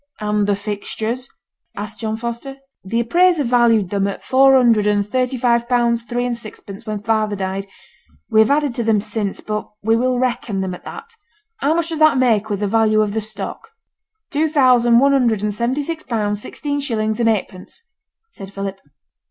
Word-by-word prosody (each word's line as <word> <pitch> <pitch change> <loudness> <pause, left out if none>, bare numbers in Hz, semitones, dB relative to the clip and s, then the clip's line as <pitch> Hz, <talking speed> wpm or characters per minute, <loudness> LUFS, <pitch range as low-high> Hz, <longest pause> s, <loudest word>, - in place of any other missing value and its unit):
'And 210 -1 0
the 205 - +2
fixtures?' 215 +4 -4 0.5
asked 210 +1 -6
John 220 -1 -2
Foster. 235 +4 -6 0.3
'The 230 +5 -1
appraiser 345 +6 +3
valued 235 -6 +3
them 200 -1 +1
at 200 - -5
four 270 +1 +5
hundred 230 -5 +4
and 205 -1 +1
thirty 255 +3 -1
five 235 -1 +1
pounds 235 -1 +2
three 240 +1 -3
and 245 -1 -1
sixpence 215 -1 -10
when 210 -1 -4
father 215 -2 0
died. 195 0 -4 0.6
We 220 - +2
have 220 - +5
added 290 -2 +1
to 235 - -2
them 220 -2 +2
since, 210 -1 -3
but 210 0 -4
we 225 +2 +3
will 250 +2 +1
reckon 240 -5 -1
them 190 -1 -3
at 180 - -11
that. 460 +1 -9 0.5
How 295 +4 +1
much 340 0 -1
does 325 -2 -4
that 310 -3 +5
make 225 -4 +2
with 205 -1 -2
the 205 - +1
value 215 0 +3
of 210 -1 -1
the 220 - -1
stock?' 215 - -7 0.6
'Two 310 +2 +1
thousand 250 -5 +4
one 275 +3 +5
hundred 235 -6 +2
and 210 -1 -1
seventy 240 +6 -1
six 325 +1 -4
pounds, 210 -3 -2
sixteen 285 +3 -4
shillings 220 -5 -1
and 230 -1 +3
eightpence,' 205 - -4 0.5
said 195 -1 -10
Philip. 195 -1 -5
230 Hz, 190 wpm, -19 LUFS, 210-255 Hz, 0.6 s, four